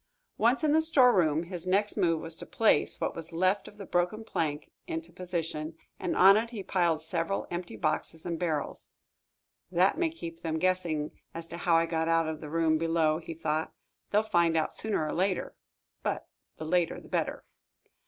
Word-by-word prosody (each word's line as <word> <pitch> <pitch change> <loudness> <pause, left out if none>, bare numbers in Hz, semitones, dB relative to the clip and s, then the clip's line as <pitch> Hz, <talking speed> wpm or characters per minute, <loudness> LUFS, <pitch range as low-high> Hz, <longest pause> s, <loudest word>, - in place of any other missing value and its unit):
Once 240 +7 +3
in 300 -1 +3
the 320 - +5
storeroom, 240 - +4
his 175 0 -6
next 205 +3 +1
move 170 -5 +2
was 165 - -4
to - - -7
place 225 - +2
what - - -2
was 165 -1 -7
left 185 +4 +1
of 205 - -13
the 200 - -8
broken 180 +6 0
plank 150 -8 -3 0.2
into 165 +1 -5
position, 165 -3 -4 0.2
and - - -2
on 195 +2 +8
it 230 +1 -1
he 220 -5 -6
piled 170 -4 +1
several 165 +4 -2
empty 175 0 -4
boxes 160 0 -2
and 170 -2 -3
barrels. 155 -5 -2 0.8
"That 185 - +3
may 340 -2 +2
keep 165 - -8
them 160 -2 -2
guessing 170 -4 0 0.2
as 165 0 -5
to 170 - -6
how 170 -1 +2
I 165 0 +4
got 165 -1 -1
out 165 -1 +3
of 155 -1 -4
the 150 - -7
room 160 0 +2
below," 165 -1 +2
he 165 -1 -7
thought. 155 0 -2 0.3
"They'll 210 +1 +3
find 170 -6 +2
out 155 - 0
sooner 215 -7 -1
or 155 - -3
later 185 +2 -1 0.5
but - - -2 0.3
the 155 - -6
later 175 +1 +1
the - - -15
better." - - -2
170 Hz, 190 wpm, -29 LUFS, 160-190 Hz, 0.8 s, on